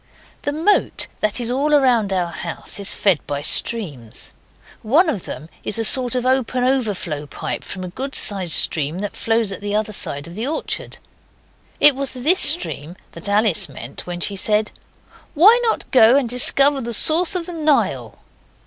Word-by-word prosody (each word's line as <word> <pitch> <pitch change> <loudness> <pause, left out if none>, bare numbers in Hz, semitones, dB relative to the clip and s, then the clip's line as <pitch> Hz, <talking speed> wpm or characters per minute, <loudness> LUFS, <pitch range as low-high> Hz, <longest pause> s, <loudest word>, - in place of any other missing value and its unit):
The 285 - -2
moat 330 +8 0
that 215 +3 -1
is 240 0 -4
all 275 +4 -1
round 250 -8 +2
our 180 -2 -2
house 170 +4 -5
is 200 - -1
fed 190 -7 +1
by 145 0 -4
streams. 150 - 0 0.5
One 295 - +2
of 240 - -3
them 155 - -8 0.2
is 210 - -2
a 225 - -1
sort 250 +1 +4
of 250 0 -2
open 255 -1 0
overflow 205 - -2
pipe - - -6
from 185 - -8
a - - -6
good 270 +9 -6
sized 190 -5 +1
stream 155 +1 +2
that 205 +1 -5
flows 225 -2 -1
at 195 - -7
the 205 0 -3
other 215 0 -2
side 145 -6 +1
of 170 - -11
the 220 +7 -4
orchard. 310 +2 -5 0.8
It 295 -2 +6
was 275 -1 -3
this 295 +9 +2
stream 235 - +4 0.2
that 170 +4 -7
Alice 205 -6 +2
meant 130 +2 -10
when 175 0 -6
she 200 - +1
said 210 +2 +1 0.6
'Why 420 +10 +6
not 450 - -2
go 240 -1 +5
and 275 -3 +1
discover 275 +3 +2
the 235 -1 -5
source 340 - 0
of 350 -2 -2
the 355 - -7
Nile? 310 -3 -1
225 Hz, 180 wpm, -19 LUFS, 185-275 Hz, 0.8 s, It